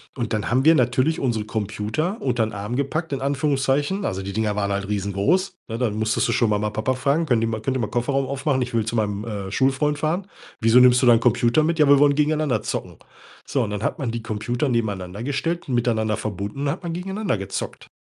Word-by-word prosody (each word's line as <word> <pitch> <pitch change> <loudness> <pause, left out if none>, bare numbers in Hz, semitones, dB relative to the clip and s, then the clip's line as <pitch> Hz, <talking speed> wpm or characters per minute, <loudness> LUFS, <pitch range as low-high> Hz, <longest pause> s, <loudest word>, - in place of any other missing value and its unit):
Und 120 -4 -3
dann 105 -2 -1
haben 130 +2 +3
wir 165 +1 +7
natürlich 130 +5 +2
unsere 115 -5 -1
Computer 110 - -3
untern 120 -4 0
Arm 105 +4 -4
gepackt, 145 +4 -2
in 135 - -2
Anführungszeichen. 145 +5 0
Also 95 +1 -2
die 100 0 -5
Dinger 110 -2 0
waren 100 -1 -1
halt 100 0 -2
riesengroß, 105 - 0
ne? 115 - -3
Dann 115 -5 0
musstest 110 0 0
du - - 0
schon 115 -3 +2
Mama 105 +1 0
Papa 110 +5 -1
fragen: 140 +6 +1
„Könnt 120 -7 +2
ihr - - +1
mal 110 -1 -3
könnt 130 +2 -1
ihr - - -3
mal 110 - -1
Kofferraum 135 +2 0
aufmachen? 135 0 -1
Ich 125 - -3
will 110 -2 +1
zu 115 - -3
meinem, 105 -1 -1
äh, 100 -4 -5
Schulfreund 135 +6 +1
fahren.“ 175 +6 -1 0.3
„Wieso 115 +2 +6
nimmst 125 0 +6
du 130 - +3
deinen 115 -1 +7
Computer 120 +4 +3
mit?“ 165 +1 0
“Ja, 150 - +5
wir 140 -1 +7
wollen 145 -1 +5
gegeneinander 150 -1 +1
zocken.“ - - -4 0.5
So, 135 - 0
und 105 - -3
dann 105 +1 -4
hat - - -1
man 130 -4 -2
die 115 -1 -5
Computer 120 +6 -2
nebeneinander 100 -4 -2
gestellt 165 +5 -2
und 125 - 0
miteinander 110 -3 +1
verbunden 100 +4 -5
und - - -1
dann 140 - +1
hat 185 - -20
man 170 -1 -3
gegeneinander 190 - -2
gezockt. 95 -1 -5
125 Hz, 235 wpm, -23 LUFS, 110-145 Hz, 0.5 s, wir